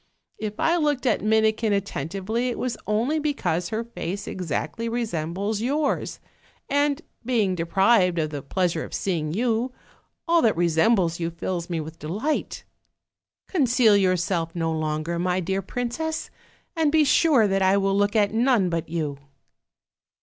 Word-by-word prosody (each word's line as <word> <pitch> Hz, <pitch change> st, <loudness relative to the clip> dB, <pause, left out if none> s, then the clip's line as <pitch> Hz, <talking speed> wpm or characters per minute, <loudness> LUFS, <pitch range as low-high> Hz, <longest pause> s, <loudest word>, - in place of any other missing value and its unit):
If 210 Hz, -1 st, -5 dB
I 335 Hz, +1 st, +3 dB
looked 295 Hz, -5 st, 0 dB
at 235 Hz, -, +2 dB
Mini 220 Hz, 0 st, +4 dB
kin 220 Hz, -1 st, -1 dB
attentively 200 Hz, -, -2 dB
it 240 Hz, -, -3 dB
was 250 Hz, -2 st, -2 dB
only 235 Hz, +9 st, +1 dB
because 225 Hz, -, -1 dB
her 220 Hz, +1 st, -2 dB
face 200 Hz, -4 st, -5 dB
exactly 180 Hz, +5 st, -3 dB
re 240 Hz, +1 st, -1 dB
sembles 195 Hz, +4 st, -3 dB
yours, 280 Hz, +5 st, -1 dB, 0.5 s
and, 285 Hz, +2 st, +1 dB, 0.2 s
being 225 Hz, -6 st, +1 dB
deprived 180 Hz, +2 st, +3 dB
of 155 Hz, -2 st, -1 dB
the 145 Hz, -2 st, -4 dB
pleasure 170 Hz, +3 st, -1 dB
of -, -, -6 dB
seeing 160 Hz, -6 st, -1 dB
you, 230 Hz, +5 st, 0 dB, 0.6 s
all 335 Hz, 0 st, +4 dB
that 220 Hz, -7 st, +2 dB
resembles 170 Hz, +1 st, +2 dB
you 165 Hz, -1 st, -1 dB
fills 170 Hz, +1 st, -4 dB
me 170 Hz, -2 st, -1 dB
with 160 Hz, +1 st, -8 dB
delight. 210 Hz, -, -3 dB, 0.8 s
Conceal 250 Hz, -, +4 dB
yourself 180 Hz, -3 st, +1 dB
no 165 Hz, -1 st, -1 dB
longer, 155 Hz, +1 st, -2 dB
my 180 Hz, +1 st, +1 dB
dear 190 Hz, +2 st, -1 dB
princess, 245 Hz, -, -3 dB, 0.4 s
and 320 Hz, -3 st, +2 dB
be 315 Hz, 0 st, +5 dB
sure 280 Hz, -5 st, +4 dB
that 195 Hz, 0 st, +1 dB
I 190 Hz, +1 st, +4 dB
will 195 Hz, 0 st, +1 dB
look 205 Hz, +1 st, +1 dB
at 210 Hz, -1 st, +3 dB
none 230 Hz, -6 st, +2 dB
but 165 Hz, -1 st, -2 dB
you." 155 Hz, -4 st, -3 dB
200 Hz, 155 wpm, -24 LUFS, 170-240 Hz, 0.8 s, be